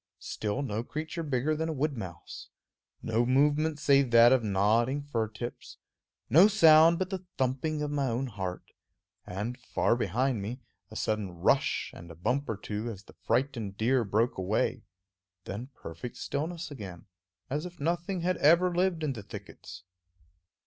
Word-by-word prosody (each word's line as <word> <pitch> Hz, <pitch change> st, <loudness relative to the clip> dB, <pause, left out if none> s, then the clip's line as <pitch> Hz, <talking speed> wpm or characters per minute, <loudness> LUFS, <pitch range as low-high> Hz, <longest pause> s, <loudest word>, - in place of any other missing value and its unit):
Still 110 Hz, +6 st, -3 dB
no 110 Hz, -3 st, -2 dB
creature 155 Hz, +6 st, -5 dB
bigger 145 Hz, 0 st, 0 dB
than 160 Hz, +1 st, -2 dB
a -, -, -1 dB
wood 145 Hz, 0 st, -1 dB
mouse; 90 Hz, -8 st, -8 dB, 0.5 s
no 115 Hz, +1 st, +1 dB
movement 145 Hz, +4 st, +2 dB
save 140 Hz, -3 st, +3 dB
that 120 Hz, 0 st, +7 dB
of 130 Hz, -3 st, +4 dB
nodding 110 Hz, +7 st, +2 dB
fir 115 Hz, -6 st, -1 dB
tips; 115 Hz, +3 st, -8 dB, 0.5 s
no 165 Hz, -, +7 dB
sound 165 Hz, -5 st, +7 dB
but 185 Hz, +1 st, -2 dB
the 190 Hz, -1 st, -4 dB
thumping 135 Hz, +4 st, -1 dB
of 145 Hz, -, -2 dB
my 140 Hz, -2 st, 0 dB
own 125 Hz, +2 st, -1 dB
heart, 95 Hz, -6 st, -6 dB, 0.6 s
and, 105 Hz, +7 st, -4 dB
far 120 Hz, -1 st, +1 dB
behind 120 Hz, +2 st, 0 dB
me, 115 Hz, +6 st, -5 dB, 0.3 s
a 110 Hz, -, -11 dB
sudden 110 Hz, -3 st, -1 dB
rush 85 Hz, -1 st, +1 dB
and 85 Hz, 0 st, -11 dB
a 85 Hz, -, -10 dB
bump 125 Hz, -, -1 dB
or 110 Hz, -, -2 dB
two 105 Hz, +2 st, -4 dB
as 105 Hz, -3 st, -8 dB
the -, -, -17 dB
frightened 120 Hz, -7 st, -1 dB
deer 120 Hz, +3 st, +2 dB
broke 110 Hz, +2 st, 0 dB
away; 95 Hz, +3 st, 0 dB, 0.6 s
then 105 Hz, +7 st, -6 dB
perfect 85 Hz, +9 st, -8 dB
stillness 160 Hz, +3 st, -4 dB
again, 95 Hz, -10 st, -8 dB, 0.5 s
as 150 Hz, +5 st, -2 dB
if 175 Hz, -1 st, -14 dB
nothing 175 Hz, +4 st, -1 dB
had 180 Hz, 0 st, 0 dB
ever 175 Hz, +4 st, +4 dB
lived 175 Hz, -2 st, +1 dB
in 145 Hz, -3 st, 0 dB
the 115 Hz, -, -7 dB
thickets. 95 Hz, -3 st, -10 dB
130 Hz, 165 wpm, -29 LUFS, 110-155 Hz, 0.6 s, that